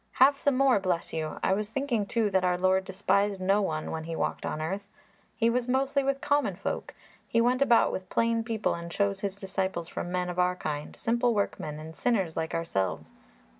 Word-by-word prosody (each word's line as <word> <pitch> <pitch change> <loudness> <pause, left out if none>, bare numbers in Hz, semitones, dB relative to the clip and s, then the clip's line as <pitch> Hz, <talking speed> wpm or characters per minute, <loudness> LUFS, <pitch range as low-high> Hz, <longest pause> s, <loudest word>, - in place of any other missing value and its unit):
"Have 275 +2 +5
some 285 -3 +2
more, 270 -5 +4
bless 180 -3 -1
you! 155 -1 -3
I 190 - +3
was 210 +1 -1
thinking, 240 -4 -1
too, 225 -2 +1
that 190 -1 +2
our 180 -1 +2
Lord 190 +1 +2
despised 200 +1 +1
no 195 +3 +2
one 155 -5 -2
when 160 0 -4
He 165 0 -4
walked - - -2
on - - -3
earth; 195 +6 -3 0.5
He 230 0 +2
was 240 +1 +1
mostly 270 +2 +1
with 275 0 0
common 290 0 +1
folk. - - -4 0.3
He 230 - +1
went 250 +3 +2
about 250 -4 +5
with 185 -1 -5
plain 230 0 +1
people 225 -2 -1
and 170 0 -6
chose 200 +1 0
His 195 -1 -3
disciples 190 -3 -3
from 175 - -5
men 180 0 -1
of 180 0 -4
our 180 0 +3
kind 150 -3 -4
simple 235 0 +1
workmen 155 -7 -2
and 160 +1 -9
sinners 195 -10 0
like 160 0 -2
ourselves. 95 - -2
195 Hz, 205 wpm, -28 LUFS, 180-235 Hz, 0.5 s, Have